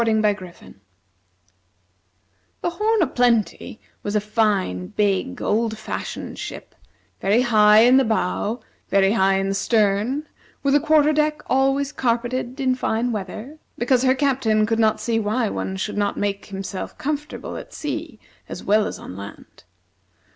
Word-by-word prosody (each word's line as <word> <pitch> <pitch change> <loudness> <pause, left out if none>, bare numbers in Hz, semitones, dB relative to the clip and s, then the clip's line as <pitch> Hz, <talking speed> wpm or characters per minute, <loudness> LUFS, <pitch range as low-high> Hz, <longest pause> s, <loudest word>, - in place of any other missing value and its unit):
The 210 -5 -1 1.9
"Horn 425 +4 +1
o' - - +3
Plenty" 235 -4 0 0.2
was 205 +1 -3
a - - +4
fine, 205 - 0
big, 190 - -1
old 220 +1 0
fashioned 220 - -6
ship, - - -7 0.5
very 205 +5 +3
high 215 -2 +6
in 250 +3 +6
the 270 - +5
bow, 220 +1 -1 0.3
very 195 0 +4
high 195 -3 +3
in 195 0 -1
the - - 0
stern, 215 +7 +1 0.4
with 275 -1 +2
a 290 - +6
quarter 310 0 +4
deck 300 0 0
always 270 +1 +1
carpeted 245 +1 -1
in 260 -1 +2
fine 245 -1 -1
weather, 215 +8 -6 0.2
because 245 +1 +2
her 260 0 +3
captain 255 -6 +2
could 225 +1 0
not 220 -1 +3
see 230 -1 0
why 220 +1 0
one 190 -1 -3
should 205 +2 -3
not 205 0 0
make 200 -1 -2
himself 195 -1 -6
comfortable 295 +1 -4
at - - -8
sea 300 -4 -5 0.3
as - - -7
well 210 +1 +3
as - - -6
on 90 - -9
land. 100 -3 -11
225 Hz, 145 wpm, -22 LUFS, 205-265 Hz, 1.9 s, high